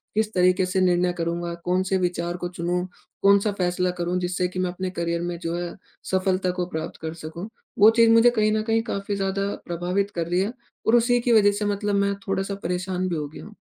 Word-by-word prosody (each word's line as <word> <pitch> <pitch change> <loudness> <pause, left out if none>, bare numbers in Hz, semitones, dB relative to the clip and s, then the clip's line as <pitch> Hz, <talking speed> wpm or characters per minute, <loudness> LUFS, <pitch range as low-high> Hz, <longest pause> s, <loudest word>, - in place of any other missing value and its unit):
किस 215 0 0
तरीक़े 185 +1 +3
से 185 +1 -1
निर्णय 180 0 +2
करूँगा 170 +1 -2
कौन 180 +1 +2
से 190 0 0
विचार 175 -1 -1
को 175 - -3
चुनूँ, 175 +1 -2 0.4
कौन-सा 200 +1 +4
फैसला 180 0 +1
करूँ 175 +1 0
जिससे 180 0 -1
कि 185 +1 -6
मैं 180 -1 0
अपने 185 +1 -4
करियर 170 -1 -2
में 175 0 -3
जो 165 0 -3
है 175 0 -4 0.4
सफलता 185 -1 +1
को 180 0 -2
प्राप्त 160 -2 -5
कर 160 0 -4
सकूँ। 165 +3 -7 0.3
वो 210 +2 +9
चीज़ 230 -1 +6
मुझे 230 +1 +7
कहीं 215 -2 +2
न 215 0 +1
कहीं 225 0 +2
काफ़ी 200 -3 -3
ज़्यादा 195 0 -1 0.2
प्रभावित 180 +4 -1
कर 170 -1 -1
रही 175 +1 +1
है 205 +5 -2 0.3
और 225 - +5
उसी 240 +1 +4
की 240 0 +2
वजह 205 -2 +6
से 205 +1 -2
मतलब 205 0 0
मैं 200 0 +2
थोड़ा-सा 195 +1 -1
परेशान 180 +1 -2
भी 175 - -1
हो 150 -2 -3
गया 145 - -11
हूँ। 215 0 -13
185 Hz, 225 wpm, -24 LUFS, 175-200 Hz, 0.4 s, वो